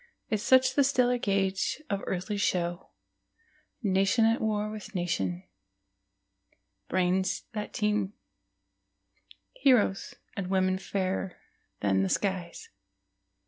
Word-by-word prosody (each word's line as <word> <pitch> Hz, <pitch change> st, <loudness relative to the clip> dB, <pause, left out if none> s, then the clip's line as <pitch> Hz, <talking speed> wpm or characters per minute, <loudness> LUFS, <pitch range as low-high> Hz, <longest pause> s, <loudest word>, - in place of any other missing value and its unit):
Is 215 Hz, -2 st, +1 dB
such 260 Hz, +2 st, +5 dB
the 280 Hz, -, +4 dB
stellar 250 Hz, -2 st, +2 dB
gauge 195 Hz, 0 st, 0 dB
of 200 Hz, -1 st, -2 dB
earthly 190 Hz, +3 st, -2 dB
show, 175 Hz, -3 st, -1 dB, 0.9 s
Nation 195 Hz, +3 st, +3 dB
at 225 Hz, +1 st, +2 dB
war 215 Hz, -1 st, 0 dB
with 215 Hz, 0 st, -9 dB
nation, 95 Hz, -, -1 dB, 1.5 s
brains 185 Hz, +1 st, +1 dB
that 210 Hz, -1 st, -4 dB
teem, 210 Hz, -2 st, 0 dB, 1.4 s
Heroes, 250 Hz, -, +2 dB, 0.2 s
and 195 Hz, -2 st, -3 dB
women 185 Hz, 0 st, +2 dB
fairer 190 Hz, -1 st, -2 dB, 0.4 s
than 95 Hz, -2 st, +2 dB
the 95 Hz, -, 0 dB
skies? 185 Hz, -, -2 dB
195 Hz, 100 wpm, -29 LUFS, 185-215 Hz, 1.5 s, such